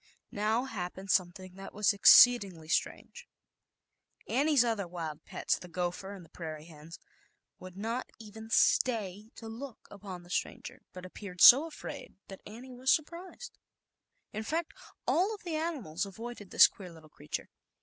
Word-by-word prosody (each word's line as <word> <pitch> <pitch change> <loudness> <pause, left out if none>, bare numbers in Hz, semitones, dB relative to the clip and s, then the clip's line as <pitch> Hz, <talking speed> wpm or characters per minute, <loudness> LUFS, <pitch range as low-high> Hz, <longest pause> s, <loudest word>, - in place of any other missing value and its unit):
Now 215 +4 0
hap 185 -9 -5
pened 190 0 -5
something 185 0 -1
that 195 0 -10
was 210 0 +2
exceedingly 200 -6 +6
strange. 480 - -3 1.0
Annie's 280 -2 +3
other 220 -5 -1
wild 160 -3 -6
pets, - - -1
the 180 - -11
gopher 180 +3 -4
and 180 -3 -12
the - - -22
prairie 155 -2 -8
hens, 160 0 -12 0.6
would 185 0 -11
not 230 +5 -4
even 220 0 -11
stay 215 -3 +1
to 225 - -10
look 235 +2 -9
upon 195 -3 -9
the 175 - -15
stranger, - - -4
but 180 0 -10
appeared 185 0 -10
so 275 +6 +9
afraid, 320 - -9
that 195 - -10
Annie 245 +5 -11
was 255 +2 -3
sur 315 - +4
prised. 360 +9 -11 0.7
In 215 - -4
fact, 320 +8 -3 0.3
all 395 +5 +1
of 420 - -17
the 345 - -5
animals 285 - -3
avoided 220 0 -9
this - - +8
queer 185 -3 -5
little 160 -2 -15
creature. 115 - -7
205 Hz, 160 wpm, -30 LUFS, 180-245 Hz, 1.0 s, so